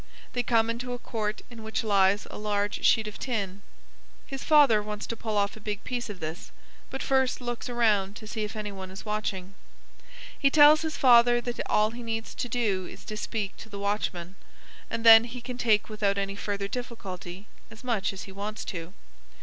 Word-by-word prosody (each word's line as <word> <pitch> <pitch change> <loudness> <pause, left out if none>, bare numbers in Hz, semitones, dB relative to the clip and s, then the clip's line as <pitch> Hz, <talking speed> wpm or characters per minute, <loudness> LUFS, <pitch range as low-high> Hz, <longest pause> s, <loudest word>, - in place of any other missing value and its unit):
They 245 - +1
come 230 -2 +2
into 245 +2 -4
a - - -3
court 215 -3 -4
in 230 -2 -10
which 220 +1 -2
lies 200 -1 +3
a - - -7
large 205 -1 -1
sheet 220 -2 +4
of 210 - -8
tin. 200 -6 -3 0.6
His 270 0 -6
father 285 -9 +6
wants 210 0 -5
to 230 - -4
pull 220 -2 -3
off 200 0 +1
a - - -11
big 205 -1 -4
piece 245 -2 -3
of 200 -3 -7
this, 160 +3 -6 0.4
but 270 - -5
first 265 -1 +2
looks 240 -1 -4
around 210 -5 +2
to 215 - -9
see 215 0 -4
if 210 - -5
any 210 -1 -4
one 190 -1 -8
is 190 +3 -9
watching. 195 -3 -3 0.9
He 275 - +4
tells 300 +1 +7
his 315 -2 -3
father 240 -1 +6
that 240 0 -5
all 215 +1 +3
he 240 +1 -8
needs 225 -1 -4
to 245 - -4
do 205 -7 0
is - - -12
to 215 - -5
speak 210 -1 -3
to 220 - -11
the 200 - -7
watchman, 195 -3 -2 0.5
and 230 - -3
then 225 0 +10
he 245 +1 -7
can 250 0 -7
take 215 -4 +3
without 205 -2 0
any 195 0 -2
further 200 -1 -3
difficulty 200 -5 -7 0.2
as 225 +2 -13
much 225 -6 0
as 195 - -8
he 195 - -10
wants 205 +3 -5
to. 170 0 -6
215 Hz, 205 wpm, -27 LUFS, 200-240 Hz, 0.9 s, then